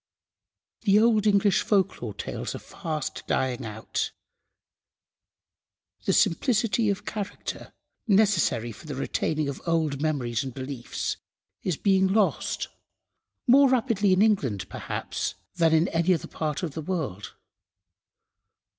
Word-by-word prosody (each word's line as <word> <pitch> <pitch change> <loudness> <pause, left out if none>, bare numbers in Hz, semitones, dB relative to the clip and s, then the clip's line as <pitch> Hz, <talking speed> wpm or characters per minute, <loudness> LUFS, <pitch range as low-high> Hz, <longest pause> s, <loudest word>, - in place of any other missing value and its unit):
The 205 -2 +4
old 215 -2 +4
English 200 -1 +4
Folklore 175 - 0
Tales - - -4
are - - -3
fast 155 -3 -5
dying 130 0 0
out. 110 -1 -3 1.9
The - - +2
simplicity 225 - +2
of 200 -1 -2
character 205 -3 -5 0.4
necessary 195 - +3
for 110 +8 -13
the 145 - -4
retaining 150 +2 -1
of 140 - -5
old 160 -4 +1
memories 135 -6 0
and 130 -2 -7
beliefs 130 -2 -4 0.4
is 180 -6 -1
being 190 -1 +3
lost, 205 +1 +1 0.8
more 275 +1 +6
rapidly 230 -6 +2
in 185 +2 +5
England, 140 - +1
perhaps, - - -4 0.2
than 165 -2 +4
in 160 +2 +4
any 170 +2 +3
other - - -5
part 155 +1 -3
of 165 - -2
the 160 - -4
world. 150 - -4
170 Hz, 120 wpm, -26 LUFS, 140-205 Hz, 1.9 s, more